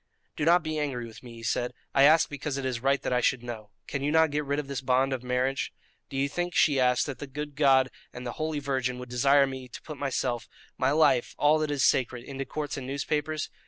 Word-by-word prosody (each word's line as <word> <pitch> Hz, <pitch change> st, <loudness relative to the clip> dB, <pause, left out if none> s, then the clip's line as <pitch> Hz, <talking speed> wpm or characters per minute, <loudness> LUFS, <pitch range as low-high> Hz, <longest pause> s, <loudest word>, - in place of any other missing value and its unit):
"Do 150 Hz, -, -1 dB
not 170 Hz, +1 st, +5 dB
be 155 Hz, -1 st, -2 dB
angry 135 Hz, -5 st, -2 dB
with 115 Hz, -1 st, -12 dB
me," 120 Hz, -2 st, -11 dB
he 115 Hz, -, -11 dB
said; 120 Hz, +2 st, -1 dB, 0.2 s
"I 135 Hz, -, +6 dB
ask 155 Hz, +2 st, +6 dB
because 145 Hz, -1 st, -4 dB
it 135 Hz, -, -3 dB
is 125 Hz, -2 st, -1 dB
right 135 Hz, +1 st, +2 dB
that -, -, -1 dB
I 125 Hz, -, +2 dB
should 125 Hz, 0 st, +1 dB
know. 110 Hz, -3 st, -7 dB, 0.2 s
Can 140 Hz, -, -4 dB
you 145 Hz, +2 st, 0 dB
not 160 Hz, -1 st, +4 dB
get 150 Hz, +1 st, 0 dB
rid 140 Hz, 0 st, -1 dB
of 150 Hz, -2 st, -3 dB
this 140 Hz, -2 st, -4 dB
bond 130 Hz, +1 st, +2 dB
of 130 Hz, -, -3 dB
marriage?" 125 Hz, +2 st, -1 dB, 0.4 s
"Do 135 Hz, -, -5 dB
you 140 Hz, +1 st, +2 dB
think," 175 Hz, +4 st, -3 dB
she 145 Hz, -4 st, +4 dB
asked, 125 Hz, -3 st, +3 dB
"that 135 Hz, -4 st, -6 dB
the 145 Hz, -, -6 dB
good 145 Hz, +1 st, -6 dB
God 135 Hz, -3 st, +4 dB, 0.2 s
and 125 Hz, 0 st, -8 dB
the 120 Hz, -, -3 dB
Holy 155 Hz, -1 st, -1 dB
Virgin 130 Hz, -3 st, -1 dB
would 125 Hz, 0 st, -8 dB
desire 140 Hz, +3 st, +4 dB
me 130 Hz, -1 st, -6 dB
to 125 Hz, -, -10 dB
put 155 Hz, -3 st, -8 dB
myself 125 Hz, -4 st, -2 dB, 0.3 s
my 130 Hz, -, +1 dB
life 145 Hz, -4 st, +3 dB
all 150 Hz, +1 st, +4 dB
that 155 Hz, -1 st, -1 dB
is 145 Hz, -3 st, +2 dB
sacred 125 Hz, -2 st, +1 dB
into 135 Hz, +1 st, -5 dB
courts 150 Hz, -1 st, -4 dB
and 130 Hz, -2 st, -6 dB
newspapers? 150 Hz, +3 st, -2 dB
135 Hz, 250 wpm, -28 LUFS, 125-145 Hz, 0.4 s, I